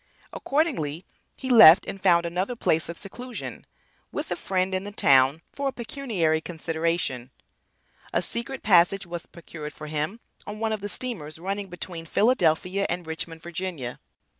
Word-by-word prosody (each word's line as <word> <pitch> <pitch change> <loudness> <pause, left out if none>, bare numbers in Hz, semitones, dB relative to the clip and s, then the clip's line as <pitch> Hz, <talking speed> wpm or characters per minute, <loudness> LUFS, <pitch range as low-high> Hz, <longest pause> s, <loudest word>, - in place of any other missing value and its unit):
Accordingly 205 - -1 0.3
he 260 - -4
left 210 -6 +9
and 195 - -6
found 170 -2 +4
another 180 +7 -2
place 160 -8 +1
of 170 - -5
seclusion 245 +5 -8 0.4
with - - -5
a - - +1
friend 190 0 -1
in 185 0 -1
the 205 - -6
town 140 -2 +4
for 280 0 -2
a - - 0
pecuniary 220 - -1
consideration. 160 -6 -2 0.8
A - - +1
secret 235 +3 -3
passage 190 0 +4
was 175 -1 -7
procured 155 -3 -9
for 155 - -9
him 155 +8 -3 0.3
on 210 0 -6
one 220 0 -1
of 215 - -4
the 205 - -4
steamers 190 -12 -3
running 195 +3 -4
between 175 -2 -7
Philadelphia 190 -3 +2
and 175 0 -2
Richmond, 160 0 -6
Va. 170 -7 -5
180 Hz, 155 wpm, -26 LUFS, 160-210 Hz, 0.8 s, left